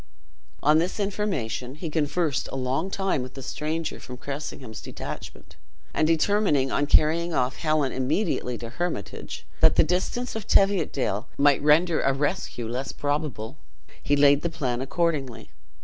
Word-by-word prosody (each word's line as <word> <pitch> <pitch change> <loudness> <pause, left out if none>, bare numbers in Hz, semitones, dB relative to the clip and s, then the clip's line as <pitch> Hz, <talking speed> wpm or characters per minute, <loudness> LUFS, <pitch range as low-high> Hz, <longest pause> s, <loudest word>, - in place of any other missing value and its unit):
On 150 +2 +5
this 180 +5 -1
information 150 - -2
he 165 +3 -5
conversed 150 -2 0
a - - -4
long 135 +7 -1
time 195 -7 0
with 125 0 -8
the 135 - -7
stranger 155 +5 -3
from 125 - -9
Cressingham's 135 -4 -6
detachment. - - -8 0.4
And 155 - +2
determining 165 -4 +2
on 145 - +1
carrying 165 +3 +3
off 130 +1 0
Helen 155 -4 +1
immediately 130 - -1
to 115 0 -7
Hermitage, 160 - -4
that - - +5
the - - +6
distance 185 +9 -1
of 220 -3 -5
Teviotdale 145 - +2
might 140 -1 +4
render 155 +3 +4
a 135 - +2
rescue 140 -4 -2
less 125 +4 -3
probable, 145 -4 -3 0.4
he 145 - +2
laid 145 0 +5
the 170 - -1
plan 130 -6 -2
accordingly. 140 -4 -1
145 Hz, 150 wpm, -26 LUFS, 130-170 Hz, 0.4 s, the